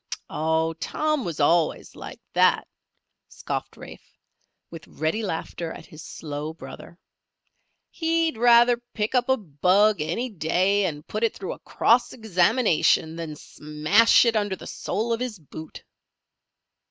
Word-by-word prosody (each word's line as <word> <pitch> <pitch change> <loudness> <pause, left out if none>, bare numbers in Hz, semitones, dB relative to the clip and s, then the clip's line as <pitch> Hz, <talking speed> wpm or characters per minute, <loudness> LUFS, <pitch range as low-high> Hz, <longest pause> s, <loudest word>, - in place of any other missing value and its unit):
"Oh, 160 +1 0
Tom 305 -3 -1
was 170 -5 -5
always 160 +2 +1
like - - -9
that," - - +3 0.6
scoffed - - -5
Rafe, - - -13 0.5
with 165 - -10
ready 160 +8 -2
laughter 170 -3 -4
at - - -10
his 155 - -13
slow 150 +1 -6
brother. 170 +1 -11 0.9
"He'd 330 -2 0
rather 240 +1 +5 0.2
pick 210 +2 -2
up 250 0 +1
a 265 - +4
bug 195 - +2
any 175 +11 -2
day 190 +3 +1
and 150 -2 -6
put 215 +2 -4
it 230 - +1
through 195 - -5
a - - -13
cross 240 +2 +2
examination, 200 -6 +2
than 165 -2 -6
smash 155 +12 +3
it 230 -1 +2
under 205 -2 0
the - - -12
sole 230 +3 -3
of 230 - -2
his 250 -4 -4
boot." 155 0 -11
190 Hz, 140 wpm, -24 LUFS, 160-230 Hz, 0.9 s, rather